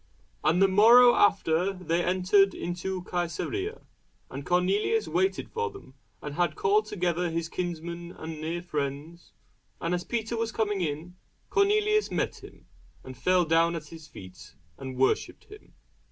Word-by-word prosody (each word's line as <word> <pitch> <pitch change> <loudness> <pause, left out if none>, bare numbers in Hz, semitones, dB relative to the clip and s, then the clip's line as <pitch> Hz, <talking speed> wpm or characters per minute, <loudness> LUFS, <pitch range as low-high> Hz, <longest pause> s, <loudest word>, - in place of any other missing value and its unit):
And 165 +5 +3
the - - +6
morrow 235 +5 +7
after 195 -2 +2
they 175 -2 -1
entered 185 +2 +3
into 180 +1 -4
Cæsarea. 180 - -3 0.5
And 140 +2 -6
Cornelius 195 - +1
waited 380 0 -1
for 460 0 -2
them, 395 - -14 0.3
and 150 - -5
had 175 +2 0
called 210 +2 +2
together 180 -3 -1
his 165 0 -3
kinsmen 170 -1 -5
and 160 -1 -8
near 170 +2 -3
friends. 150 +1 -5 0.5
And 165 +1 -2
as 175 0 -1
Peter 230 +1 -3
was 225 0 -2
coming 210 -3 -1
in, 165 +3 -4 0.3
Cornelius 425 +1 +2
met - - -3
him, - - -14 0.4
and 130 - -9
fell 180 +7 +2
down 165 +1 +2
at 155 -3 -7
his 160 -2 -12
feet, 90 - -13 0.2
and 130 +4 -8
worshipped 130 +1 0
him. 420 0 -16
180 Hz, 150 wpm, -27 LUFS, 165-210 Hz, 0.5 s, morrow